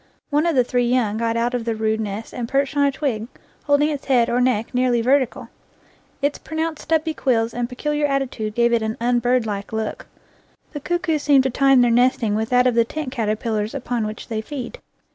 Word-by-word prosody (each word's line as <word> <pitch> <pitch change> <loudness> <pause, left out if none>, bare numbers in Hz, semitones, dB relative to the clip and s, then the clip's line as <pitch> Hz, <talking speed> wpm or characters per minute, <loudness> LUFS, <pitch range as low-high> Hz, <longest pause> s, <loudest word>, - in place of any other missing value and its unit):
One 300 +3 +2
of 335 - +1
the 250 - +5
three 245 0 0
young 235 -4 +1
got 230 0 0
out 240 +1 0
of 245 -2 -1
the 230 -1 -2
rude 220 0 0
nest 210 +1 -5
and 235 -2 -4
perched 275 +1 0
on 285 -1 +3
a - - +1
twig, 260 -6 -2 0.4
holding 290 +1 +3
its 290 -3 -4
head 245 -3 +3
or 245 +1 +2
neck 245 -3 0
nearly 250 -1 +2
vertical. 255 +1 +1 0.7
Its 285 +1 0
pronounced 315 0 -3
stubbly 320 0 0
quills 230 -6 0
and 240 0 -2
peculiar 295 +3 -1
attitude 250 -6 -2
gave 235 0 +3
it' 235 - +2
an 220 0 -3
unbirdlike 240 -4 0
look. 220 -1 -4 0.7
The 295 - -4
cuckoos 330 0 -1
seem 280 -2 +4
to 265 - -1
tune 270 0 +4
their 240 -1 +3
nesting 240 -2 +2
with 220 +2 -1
that 250 -1 +4
of 250 - +3
the 230 0 +4
tent 285 +3 -5
caterpillars 220 -1 -2
upon 240 -4 -2
which 215 +2 -7
they 220 -2 -3
feed. 280 - -7
245 Hz, 205 wpm, -21 LUFS, 225-280 Hz, 0.7 s, the